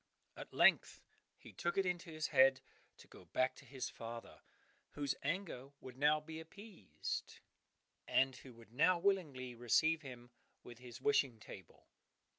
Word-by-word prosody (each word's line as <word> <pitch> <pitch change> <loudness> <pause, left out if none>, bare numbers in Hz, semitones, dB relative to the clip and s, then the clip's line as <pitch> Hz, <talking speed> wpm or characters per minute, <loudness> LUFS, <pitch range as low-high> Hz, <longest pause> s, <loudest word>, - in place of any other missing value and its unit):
At - - -9
length - - +4 0.4
he - - -14
took 175 +2 -2
it 195 - +3
into 180 0 -2
his 155 -1 -3
head 135 -1 +5 0.4
to - - -16
go - - -15
back 130 0 0
to - - -14
his 130 0 -5
father, 115 0 -8 0.5
whose 145 -2 -1
anger 150 -4 -3
would 130 -2 -10
now 150 +3 +4
be 160 +1 -8
appeased, 180 - -7 0.7
and 135 0 +3
who 130 - -12
would 115 0 -17
now 165 +7 +4
willingly 160 -10 0
receive 150 +7 +2
him 120 -4 -10 0.3
with 120 -1 -11
his 120 -1 -11
wishing 135 - +2
table. 95 -3 -12
135 Hz, 150 wpm, -37 LUFS, 125-165 Hz, 0.7 s, head